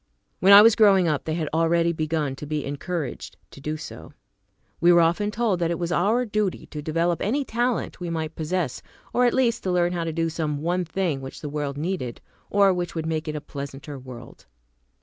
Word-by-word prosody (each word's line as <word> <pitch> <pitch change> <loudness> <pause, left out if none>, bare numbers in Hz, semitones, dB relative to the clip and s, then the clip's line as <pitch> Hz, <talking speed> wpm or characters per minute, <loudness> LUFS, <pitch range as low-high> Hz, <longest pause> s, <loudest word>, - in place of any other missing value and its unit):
When 195 - +5
I 200 +1 +11
was 225 -1 +6
growing 195 -5 +5
up, 150 -3 -1
they 155 - -1
had 160 -3 -2
already 170 +1 +2
begun 155 -3 -1
to 150 - -7
be 150 -1 -2
encouraged 145 +2 -5
to 140 - -13
do 155 +2 -3
so. - - -10 0.7
We 175 +2 +5
were 175 0 +6
often 175 +5 +2
told 210 -4 0
that 170 -1 +1
it 170 - -1
was 170 0 -3
our 215 +9 +2
duty 210 -3 -1
to 150 - -5
develop 165 +2 0
any 270 +8 0
talent 240 +1 -1
we 175 -1 -4
might 160 -1 -3
possess, 160 -3 -2 0.3
or 250 - +3
at 240 - +3
least 240 -3 +2
to 185 - -2
learn 175 0 +2
how 170 -1 -2
to 165 - -2
do 165 +1 0
some 155 -2 -3
one 180 +2 0
thing 165 -4 -2
which 135 0 -9
the 150 - -5
world 145 -1 -3
needed, 150 -7 -3 0.3
or 200 -1 +4
which 175 -1 -3
would 160 -1 -3
make 160 0 -2
it 155 - -3
a 150 - -4
pleasanter 140 0 -7
world. 125 -2 -12
170 Hz, 215 wpm, -24 LUFS, 150-190 Hz, 0.7 s, I